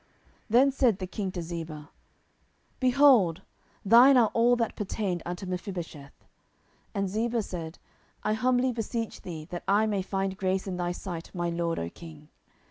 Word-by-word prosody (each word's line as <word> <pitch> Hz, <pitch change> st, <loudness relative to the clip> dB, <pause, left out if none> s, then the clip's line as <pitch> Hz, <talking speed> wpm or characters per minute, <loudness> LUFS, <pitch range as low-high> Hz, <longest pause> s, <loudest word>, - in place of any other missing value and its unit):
10:016:004 -, -, -37 dB, 0.4 s
Then 255 Hz, +5 st, +5 dB
said 255 Hz, -7 st, +2 dB
the 185 Hz, -, -4 dB
king 190 Hz, +1 st, -4 dB
to 175 Hz, -, -3 dB
Ziba, 160 Hz, -3 st, -7 dB, 0.9 s
Behold, 250 Hz, -, +4 dB, 0.4 s
thine 245 Hz, +6 st, +7 dB
are 230 Hz, -3 st, +4 dB
all 235 Hz, +1 st, +4 dB
that 230 Hz, -2 st, -1 dB
pertained 195 Hz, -3 st, -2 dB
unto 180 Hz, +2 st, -5 dB
Mephibosheth. 175 Hz, -6 st, -7 dB, 0.7 s
And 195 Hz, -1 st, 0 dB
Ziba 225 Hz, +3 st, -1 dB
said, 165 Hz, -3 st, -6 dB, 0.5 s
I 215 Hz, -, +1 dB
humbly 250 Hz, +3 st, +2 dB
beseech 230 Hz, -1 st, -4 dB
thee 160 Hz, -4 st, -7 dB
that 175 Hz, -, -5 dB
I 205 Hz, +2 st, +4 dB
may 205 Hz, -3 st, 0 dB
find 195 Hz, 0 st, -2 dB
grace 190 Hz, 0 st, -1 dB
in 185 Hz, -2 st, -4 dB
thy 175 Hz, 0 st, -1 dB
sight, 175 Hz, -2 st, -6 dB
my 175 Hz, -1 st, -1 dB
lord, 170 Hz, 0 st, -1 dB
O 85 Hz, -, -2 dB
king. 155 Hz, -3 st, -13 dB
190 Hz, 160 wpm, -28 LUFS, 175-230 Hz, 0.9 s, thine